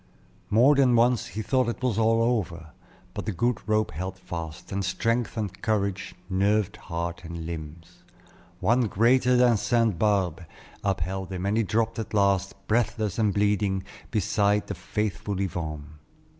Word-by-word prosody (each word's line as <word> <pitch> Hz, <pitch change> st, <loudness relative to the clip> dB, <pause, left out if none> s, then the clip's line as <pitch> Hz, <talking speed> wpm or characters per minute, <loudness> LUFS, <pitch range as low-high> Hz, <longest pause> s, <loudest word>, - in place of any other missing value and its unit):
More 120 Hz, +7 st, +6 dB
than 135 Hz, -4 st, +4 dB
once 120 Hz, 0 st, +3 dB
he 110 Hz, +4 st, -5 dB
thought 130 Hz, +1 st, +1 dB
it 120 Hz, -, -5 dB
was 120 Hz, -4 st, +1 dB
all 115 Hz, +1 st, +3 dB
over; 85 Hz, -9 st, -1 dB, 0.4 s
but -, -, -5 dB
the -, -, +1 dB
good 120 Hz, +5 st, 0 dB
rope 110 Hz, 0 st, +2 dB
held 95 Hz, +5 st, -5 dB
fast, 80 Hz, -4 st, -7 dB
and 100 Hz, 0 st, -1 dB
strength 115 Hz, +6 st, -1 dB
and 100 Hz, -3 st, -4 dB
courage 100 Hz, -3 st, -1 dB
nerved 100 Hz, +2 st, +1 dB
heart 85 Hz, 0 st, -5 dB
and 85 Hz, -1 st, -6 dB
limbs. 85 Hz, +2 st, -8 dB, 0.6 s
One 115 Hz, +5 st, +3 dB
greater 125 Hz, +5 st, +3 dB
than 125 Hz, -2 st, +5 dB
St. 115 Hz, -5 st, +1 dB
Barbe 95 Hz, -4 st, +1 dB, 0.4 s
upheld 95 Hz, 0 st, -2 dB
him, 95 Hz, 0 st, -3 dB
and 100 Hz, +2 st, +1 dB
he 115 Hz, -, +3 dB
dropped 115 Hz, +1 st, 0 dB
at 110 Hz, -, -4 dB
last, 100 Hz, -1 st, +2 dB
breathless 110 Hz, -2 st, 0 dB
and 105 Hz, -2 st, +3 dB
bleeding, 100 Hz, -1 st, +1 dB, 0.3 s
beside 105 Hz, -1 st, +1 dB
the -, -, -4 dB
faithful 100 Hz, +2 st, -3 dB
Yvonne. 75 Hz, -5 st, -4 dB
100 Hz, 155 wpm, -26 LUFS, 90-115 Hz, 0.6 s, More